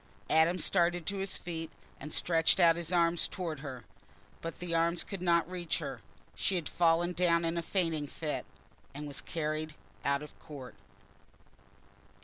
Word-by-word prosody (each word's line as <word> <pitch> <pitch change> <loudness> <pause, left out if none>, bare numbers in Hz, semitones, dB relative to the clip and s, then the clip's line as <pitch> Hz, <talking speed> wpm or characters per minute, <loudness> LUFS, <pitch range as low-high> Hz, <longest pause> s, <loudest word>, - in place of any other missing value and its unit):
Adam 160 +3 +5
started 175 -2 +2
to 200 +3 -1
his 195 0 -2
feet 165 -2 -5 0.3
and 150 +3 -7
stretched 165 +3 +3
out 170 -2 +7
his 170 0 -4
arms 170 -1 +3
towards 165 -6 -4
her. 130 -5 -6 0.6
But 165 0 -5
the 175 -1 -4
arms 165 +1 +3
could 195 -3 -6
not 170 -2 +3
reach 175 -2 -2
her: - - -5 0.3
she 195 - 0
had 170 -4 -1
fallen 175 +1 +3
down 170 -1 +3
in 165 +1 0
a 170 - 0
fainting 165 -4 0
fit, 150 +1 -4 0.5
and 150 +1 -5
was 145 -2 -2
carried 155 -1 -3 0.3
out 140 +1 +1
of 150 - -12
court. 135 -4 -9
165 Hz, 160 wpm, -32 LUFS, 155-175 Hz, 0.6 s, out